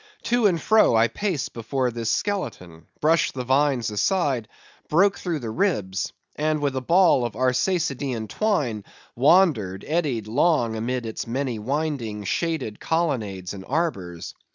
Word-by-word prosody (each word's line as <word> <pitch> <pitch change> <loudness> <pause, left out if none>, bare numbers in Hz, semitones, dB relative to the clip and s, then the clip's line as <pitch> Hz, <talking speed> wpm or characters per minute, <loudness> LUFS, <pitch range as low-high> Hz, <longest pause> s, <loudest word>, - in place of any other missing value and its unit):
To 240 -2 +3
and 175 -4 +1
fro 215 - +4
I 115 +1 +4
paced 175 - -2
before 125 +2 -1
this 115 -1 -3
skeleton—brushed 155 - -1
the 125 - -3
vines 130 -3 +1
aside—broke 155 - 0
through 175 -3 -2
the 115 -6 -5
ribs—and 155 - -2
with 140 -2 -1
a 130 - -1
ball 170 -2 +4
of 120 -3 -3
Arsacidean 130 - 0
twine, 135 - -1 0.3
wandered, 130 - +3
eddied 145 -9 0
long 120 -1 +2
amid 120 +2 -2
its 110 0 -5
many 125 -1 -2
winding, 125 -4 -2
shaded 135 - -2
colonnades 110 - -1
and 95 -1 -8
arbours. 100 - -2
130 Hz, 130 wpm, -24 LUFS, 110-165 Hz, 0.3 s, fro